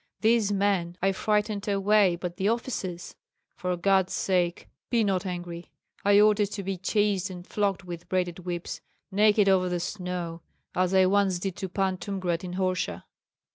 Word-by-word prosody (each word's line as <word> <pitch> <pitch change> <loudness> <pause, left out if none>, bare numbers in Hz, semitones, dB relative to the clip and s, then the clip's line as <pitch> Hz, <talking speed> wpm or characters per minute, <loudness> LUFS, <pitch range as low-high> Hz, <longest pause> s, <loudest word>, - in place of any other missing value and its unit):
These 220 -2 +3
men 195 -4 0
I 195 - +4
frightened 210 +1 0
away, 200 -2 +3
but 175 0 -6
the 195 +2 +1
officers 215 -7 -3 0.4
for 180 -1 -2
God's 190 0 +2
sake 175 -2 0 0.2
be 235 -2 +2
not 195 -1 0
angry! 175 -1 -6 0.3
I 205 0 +5
ordered 210 -1 +4
to 200 - -4
be 195 +1 -2
chased 200 0 +1
and 180 -1 -8
flogged 200 -2 -1
with 175 -1 -8
braided 180 -2 -1
whips, 175 -1 -5 0.3
naked 210 +1 +4
over 185 -2 +3
the 175 0 -1
snow, 180 -2 -4 0.3
as 185 +1 +1
I 190 0 +6
once 195 -1 +2
did 185 0 -3
to 190 - -4
Pan 190 0 0
Tumgrat 180 -2 -2
in 180 -1 -5
Orsha." 185 -1 -1
190 Hz, 165 wpm, -27 LUFS, 180-205 Hz, 0.4 s, I